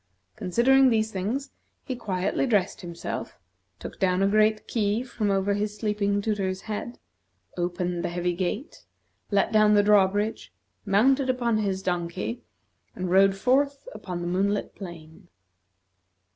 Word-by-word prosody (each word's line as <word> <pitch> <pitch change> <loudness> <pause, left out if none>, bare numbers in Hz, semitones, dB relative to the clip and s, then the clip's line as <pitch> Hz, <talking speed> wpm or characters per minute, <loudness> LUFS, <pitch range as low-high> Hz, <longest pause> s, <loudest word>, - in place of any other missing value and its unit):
Considering 240 +7 +4
these 220 -2 +1
things, 225 +9 -3 0.3
he 260 - -3
quietly 195 +3 -1
dressed 205 -5 +1
himself, 170 -2 -6 0.4
took - - -9
down 185 -1 +2
a - - +4
great 215 +1 +2
key 215 +1 0
from 235 -4 -2
over 195 +1 +1
his 210 +1 -2
sleeping 205 -1 0
tutor's 195 -3 -1
head, 220 +2 -5 0.6
opened 175 0 -2
the - - -1
heavy 175 +1 -1
gate, 195 - -4 0.5
let 200 -2 +2
down 215 -1 +5
the 205 - +5
drawbridge, 205 +1 +2 0.4
mounted 260 +7 +3
upon 240 -3 +1
his 195 -2 -2
donkey, 170 - -3 0.5
and 185 -1 -3
rode 195 +1 +5
forth 275 - +1
upon 180 -2 -6
the 175 - -3
moonlit 200 +3 0
plain. 165 -5 -11
205 Hz, 135 wpm, -26 LUFS, 185-220 Hz, 0.6 s, down